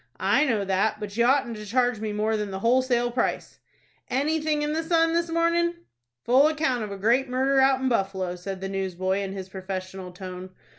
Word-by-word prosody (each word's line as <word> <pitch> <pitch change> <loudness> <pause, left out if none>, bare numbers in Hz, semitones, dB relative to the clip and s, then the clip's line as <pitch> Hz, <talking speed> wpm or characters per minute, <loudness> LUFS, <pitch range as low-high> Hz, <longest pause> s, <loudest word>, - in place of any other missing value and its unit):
"I - - +3
know 220 -7 0
that; 195 +3 0
but 205 -1 -6
you 235 +1 +3
oughtn't 250 -3 +2
to 210 - -8
charge 245 0 +1
me 215 -1 -3
more 215 +1 0
than 210 -1 -2
the 190 - -4
wholesale 245 0 +2
price." 240 0 -2 0.5
"Anything 300 +3 0
in 300 0 -1
the 320 - 0
'Sun' 330 0 +2
this 335 0 0
mornin'?" 335 +1 +1 0.5
"Full 265 +4 +5
account 300 -7 0
of 210 - -6
a 200 - -5
great 240 +6 +2
murder 265 +2 +2
out 265 0 +4
in 265 - 0
Buffalo," 195 -6 -1
said 190 +1 -6
the 195 - -3
newsboy, 190 0 -1
in 195 -1 -4
his 190 -1 -6
professional 185 -1 -6
tone. 185 0 -9
230 Hz, 200 wpm, -25 LUFS, 195-270 Hz, 0.5 s, Full